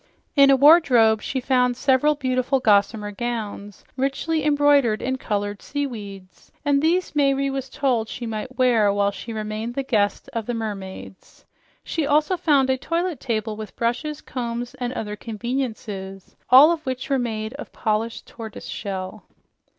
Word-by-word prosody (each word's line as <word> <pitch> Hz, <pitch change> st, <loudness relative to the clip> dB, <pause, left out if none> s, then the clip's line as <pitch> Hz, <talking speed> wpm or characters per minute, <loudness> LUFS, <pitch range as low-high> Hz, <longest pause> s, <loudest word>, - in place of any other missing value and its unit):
In 280 Hz, -1 st, +7 dB
a 275 Hz, -, +7 dB
wardrobe 255 Hz, -7 st, +6 dB
she 265 Hz, -, -3 dB
found 250 Hz, -1 st, +1 dB
several 275 Hz, +3 st, +3 dB
beautiful 255 Hz, -1 st, 0 dB
gossamer 210 Hz, -1 st, +2 dB
gowns 210 Hz, -3 st, -5 dB
richly 275 Hz, +4 st, -1 dB
embroidered 290 Hz, -6 st, +3 dB
in 260 Hz, +1 st, -2 dB
colored 205 Hz, -2 st, -3 dB
seaweeds, 205 Hz, -10 st, -6 dB
and 285 Hz, -1 st, +3 dB
these 340 Hz, +2 st, +1 dB
Mayre 275 Hz, -1 st, +2 dB
was 270 Hz, -1 st, -4 dB
told 245 Hz, -6 st, 0 dB
she 245 Hz, -, -6 dB
might 225 Hz, +3 st, -5 dB
wear 235 Hz, -5 st, +4 dB
while 200 Hz, 0 st, +1 dB
she 200 Hz, +4 st, -8 dB
remained 215 Hz, +2 st, -4 dB
the 275 Hz, -, -1 dB
guest 210 Hz, -6 st, 0 dB
of 230 Hz, -3 st, -3 dB
the 245 Hz, -, -2 dB
mermaids. 195 Hz, -4 st, -7 dB, 0.4 s
She 315 Hz, -3 st, -2 dB
also 300 Hz, +5 st, +2 dB
found 290 Hz, -7 st, +2 dB
a 260 Hz, -, +1 dB
toilet 335 Hz, 0 st, -2 dB
table 220 Hz, -3 st, -2 dB
with 215 Hz, 0 st, -8 dB
brushes, 265 Hz, +6 st, -2 dB
combs 240 Hz, -1 st, -4 dB
and 245 Hz, -1 st, -2 dB
other 210 Hz, -4 st, -4 dB
conveniences, 215 Hz, -4 st, -5 dB
all 275 Hz, +6 st, +9 dB
of 330 Hz, -2 st, -2 dB
which 260 Hz, 0 st, -4 dB
were 270 Hz, -, +3 dB
made 220 Hz, -2 st, -3 dB
of -, -, -8 dB
polished 220 Hz, +1 st, -2 dB
tortoise 225 Hz, -3 st, -9 dB
shell. 195 Hz, 0 st, -6 dB
245 Hz, 155 wpm, -23 LUFS, 215-275 Hz, 0.4 s, all